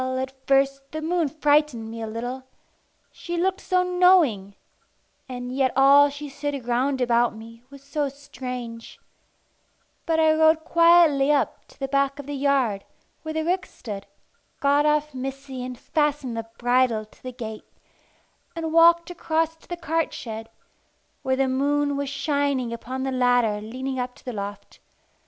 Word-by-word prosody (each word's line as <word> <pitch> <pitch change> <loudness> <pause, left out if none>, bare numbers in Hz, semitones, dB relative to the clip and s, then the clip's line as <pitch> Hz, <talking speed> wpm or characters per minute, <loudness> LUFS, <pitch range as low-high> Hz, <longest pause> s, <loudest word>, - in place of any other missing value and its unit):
Well, 260 0 -2
at 260 0 -3
first, 275 0 +3
the 310 - -3
moon 335 0 +1
frightened 290 -6 +1
me 230 0 -7
a 225 - -4
little 245 +4 -5 0.7
she 345 0 -6
looked 380 +2 0
so 365 -1 +1
knowing, 360 - +3 0.7
and 250 0 -5
yet 265 -2 +2
all 280 +2 +7
she 290 +1 -7
said 285 -2 -5
round 260 +3 0
about 240 -1 +2
me 230 +1 -12
was 280 -1 -14
so 285 0 -2
strange. 250 -4 -8 1.1
But 325 -1 +2
I 315 -1 +5
rode 315 0 +3
quietly 335 -5 +5
up 290 - 0
to - - -21
the 270 - -2
back 275 0 +1
of 285 - -8
the 290 - -5
yard 270 -8 +1 0.4
where 315 0 -6
the 315 0 -1
ricks 365 +2 -1
stood, 205 -5 -7 0.5
got 285 +1 +3
off 300 0 +1
Missy 265 0 -6
and 250 -1 -6
fastened 295 -4 -1
the 225 0 -5
bridle 245 -3 +2
to 215 - -24
the 255 - -6
gate, 220 -3 -8 0.9
and 325 -1 -3
walked 340 +1 +5
across 325 -1 -1
to - - -23
the 350 - -5
cart 325 -1 -1
shed, 225 -2 -7 0.7
where 260 0 0
the 270 0 +1
moon 285 +2 +1
was 280 -1 -2
shining 280 -3 -1
upon 255 +3 -5
the 270 - -2
ladder 245 -4 +2
leading 260 +4 -5
up 250 0 -4
to - - -20
the 250 - -4
loft. 200 -1 -7
275 Hz, 165 wpm, -24 LUFS, 245-300 Hz, 1.1 s, all